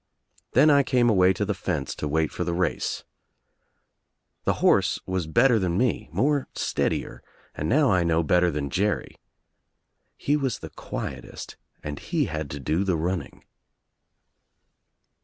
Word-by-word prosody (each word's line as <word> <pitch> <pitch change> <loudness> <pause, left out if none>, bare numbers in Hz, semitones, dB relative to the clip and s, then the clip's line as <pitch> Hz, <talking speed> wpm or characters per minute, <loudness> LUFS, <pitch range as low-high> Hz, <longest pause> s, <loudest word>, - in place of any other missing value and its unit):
Then 150 +5 +6
I 140 -1 +6
came 125 -3 +2
away 95 -2 +5
to 105 - -2
the 105 - -1
fence 75 -8 -3
to 75 - -3
wait 80 +1 0
for - - -3
the 85 -1 -2
race. 90 0 -1 1.4
The - - +3
horse - - +3
was 95 -3 -2
better 115 - +4
than 90 -2 0
me, 120 - 0
more 140 - +1
steadier, - - -2 0.3
and 75 - -3
now 145 -4 +4
I 90 -2 +3
know 85 0 +2
better 90 +3 +3
than 70 -3 -3
Jerry. 105 +3 -1 1.0
He 145 - +1
was 135 -5 -1
the - - -9
quietest - - -7 0.3
and 75 -1 -5
he - - -1
had 75 -2 -4
to 70 - -6
do 80 +7 0
the 95 -4 0
running. 90 +3 -3
90 Hz, 150 wpm, -25 LUFS, 80-120 Hz, 1.4 s, Then